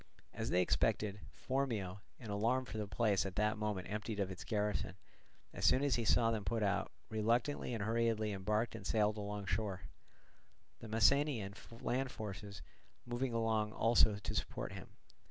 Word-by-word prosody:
As - - -3
they 90 +3 +4
expected, 100 - +1
Phormio, 115 -8 -2 0.2
in 110 -4 -6
alarm 115 +6 +1
for 110 - -5
the 105 - -2
place 105 -2 +2
at 95 -2 -5
that 105 0 +1
moment 105 -4 -2
emptied 105 0 -3
of 95 -1 0
its 90 -2 -7
garrison, 105 -3 -1 0.6
as - - -6
soon 130 - +5
as 140 -2 +2
he 115 - +1
saw 115 +1 +4
them 110 -2 -1
put 115 +2 0
out, 100 0 0 0.2
reluctantly 115 +6 +1
and 115 -4 -2
hurriedly 110 -1 +1
embarked 105 +4 0
and 105 -4 -6
sailed 105 -1 +2
along 105 -1 -4
shore; 100 -2 -1 1.0
the 115 - -8
Messenian 115 -1 +3 0.3
land 130 +2 0
forces 100 -4 -7 0.4
moving 120 +1 -1
along 110 -2 +1
also 115 -2 +4
to 100 - -4
support - - -2
him. - - -8
110 Hz, 165 wpm, -36 LUFS, 100-115 Hz, 1.0 s, soon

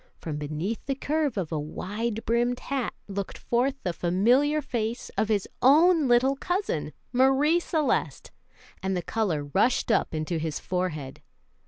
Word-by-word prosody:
From 155 -3 -5
beneath 155 +9 -3
the 275 - 0
curve 290 -3 -1
of 175 -5 -2
a 155 - -1
wide 210 +9 -4
brimmed 240 +2 +1
hat 270 -4 -3
looked 200 -1 -5
forth 255 +3 0
the 175 - -1
familiar 240 - +2
face 235 -4 -3
of 220 - 0
his 205 -3 +1
own 310 +3 +5
little 250 +3 +4
cousin, 350 - -2 0.2
Marie 270 +6 +4
Celeste, 315 -4 -1 0.5
and 190 -1 -1
the 175 - -3
color 190 -10 -1
rushed 240 +6 +2
up - - +1
into 155 +2 -2
his 155 -1 -3
forehead. 175 -7 -3
230 Hz, 150 wpm, -27 LUFS, 180-270 Hz, 0.5 s, own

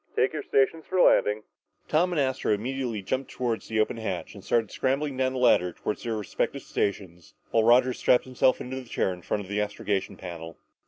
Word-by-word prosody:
Take - - +2
your - - -3
stations 150 +4 +1
for 185 - 0
landing!" 105 -9 +4 0.4
Tom 175 +4 +2
and 170 - 0
Astro 130 -4 0
immediately 120 -1 -3
jumped 130 +7 -2
toward 120 -3 -2
the 110 -1 -3
open 110 +1 +1
hatch 95 -6 -4
and 100 -3 -12
started 115 -3 +1
scrambling 140 +2 -1
down 130 0 0
the - - -3
ladder 90 -8 +4
toward 105 - -4
their 115 -2 -3
respective 105 -2 -2
stations 90 -5 -3 0.2
while 115 - +3
Roger 125 +2 +5
strapped 125 - +3
himself 130 0 +2
into 130 +1 -5
his 130 -3 -8
chair 95 - 0
in 90 - -11
front 105 +4 -2
of - - -12
the 105 +2 -1
astrogation 105 -1 -2
panel. 85 -1 -8
115 Hz, 205 wpm, -27 LUFS, 105-130 Hz, 0.4 s, Roger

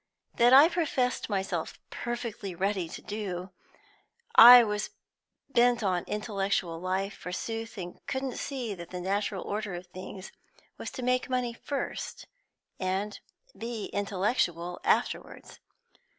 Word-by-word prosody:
That 240 +1 +6
I 275 +4 +9
professed 285 -10 0
myself 190 -5 -2
perfectly 235 -6 -4
ready 190 -2 -1
to - - -9
do; 190 -3 -5 0.8
I 245 +1 +11
was 210 -1 -2 0.6
bent 240 -3 +3
on 185 -3 +2
an 175 - -3
intellectual 195 -5 -1
life, 190 +3 -1
forsooth; 225 +5 -5 0.3
couldn't 265 -2 -3
see 250 -6 -3
that 170 -3 -9
the 180 - -5
natural 195 +1 -1
order 205 -2 -3
of 175 +1 -7
things 185 +1 -9 0.5
was - - -4
to 255 - -5
make 250 +1 +1
money 250 -2 0
first 275 +4 -5 0.5
and 195 +2 -2 0.4
be 230 -2 -5
intellectual 185 -4 -1
afterwards. - - -1
205 Hz, 120 wpm, -29 LUFS, 185-240 Hz, 0.8 s, I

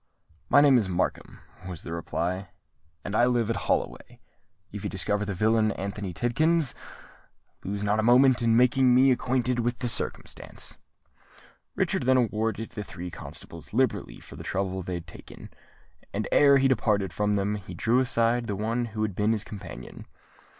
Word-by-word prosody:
"My 145 - +6
name 140 -4 +6
is 100 -4 -2
Markham," 90 0 -3 0.3
was 90 -3 -7
the 85 - -6
reply, 85 +2 -3 0.6
"and 100 - -4
I 120 - +5
live 120 -3 +1
at - - -1
Holloway. - - -2 0.5
If 105 -1 -7
you - - -2
discover 105 +2 -1
the 100 -2 -4
villain 110 +2 +2
Anthony 100 0 -5
Tidkins, 150 - +1 0.9
lose 100 +1 -4
not 105 +1 +1
a - - +3
moment 125 +2 +5
in 115 -1 +3
making 125 +1 +4
me 130 +1 +6
acquainted 125 0 0
with 120 +1 -1
the 125 - -1
circumstance." 115 - 0 1.0
Richard - - 0
then 130 0 +5
rewarded 115 -1 -1
the 105 - -6
three 90 -2 -8
constables - - -8
liberally - - 0
for - - -13
the - - -8
trouble 95 -1 -2
they 90 0 -4
had 85 -1 -6
taken; 85 - -12 0.6
and 105 +1 -3
ere 140 -1 +6
he 135 0 +3
departed 105 -8 +1
from 105 0 0
them, 100 +1 0
he 95 -4 -7
drew 115 +8 +2
aside 120 -1 +1
the 105 - -2
one 115 +4 -1
who 110 -1 -4
had 105 -2 -2
been 105 +4 +1
his 110 -2 -2
companion. 95 - -10
110 Hz, 170 wpm, -26 LUFS, 100-120 Hz, 1.0 s, My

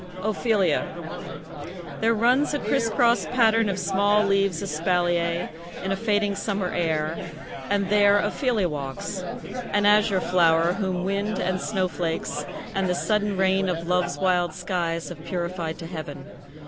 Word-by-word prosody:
OPHELIA 215 -1 +1 1.0
There 225 +1 +2
runs 250 +7 +3
a - - -1
crisscross 235 0 +2
pattern 225 -3 +3
of 195 - -1
small 200 +2 +2
leaves 195 -3 +1
Espalier, 170 +1 0 0.3
in 190 - -1
a - - +2
fading 205 -1 +1
summer 195 -2 -2
air, 160 -1 -1 0.4
And 200 -1 +1
there 205 -1 +5
Ophelia 230 -4 +1
walks, 145 +5 -5 0.5
an 205 0 +3
azure 210 -1 +4
flower, 170 -1 +3
Whom 185 -2 -2
wind, 200 +2 -1
and 185 0 -1
snowflakes, 165 -5 -2 0.3
and 195 -2 0
the 180 - +1
sudden 210 +1 0
rain 190 0 +2
Of 170 -1 -3
love's 180 0 +1
wild 180 -3 +1
skies 170 -3 -2
have 160 -3 -9
purified 170 -2 -3
to 165 - -8
heaven. 155 -5 -7
190 Hz, 135 wpm, -25 LUFS, 170-205 Hz, 1.0 s, there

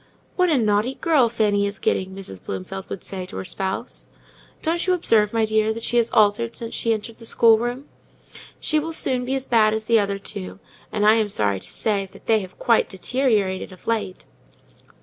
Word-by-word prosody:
"What 365 -1 +3
a 305 - +3
naughty 215 +3 +1
girl 290 -8 +3
Fanny 205 -3 +1
is 200 0 -5
getting!" 190 0 -1
Mrs. 185 - -8
Bloomfield 100 - -6
would 195 - -6
say 185 -2 -6
to - - -8
her - - -5
spouse. 190 +6 -4 0.6
"Don't 340 +3 0
you 370 - +4
observe, 215 - +2
my 225 -1 +2
dear, 215 0 +1
how 225 - -4
she 240 +1 +2
is 235 0 +1
altered 215 +2 +2
since 230 -1 -5
she 230 - 0
entered 220 +1 -3
the 230 - -10
schoolroom? 240 +5 +3 0.7
She 310 - +1
will 325 +2 -4
soon 255 -5 0
be 265 +2 -1
as 265 -1 -2
bad 220 -3 +3
as 220 0 -4
the 230 0 +4
other 200 -1 -1
two; 95 - -6 0.3
and, 210 -1 0
I 215 +1 +6
am 215 -2 +1
sorry 100 - 0
to - - -11
say, 200 -3 -1 0.2
they 220 -1 +3
have 185 -2 -9
quite 230 -2 +2
deteriorated 205 -3 0
of 185 - -15
late." 210 -5 -2
220 Hz, 200 wpm, -22 LUFS, 195-235 Hz, 0.7 s, I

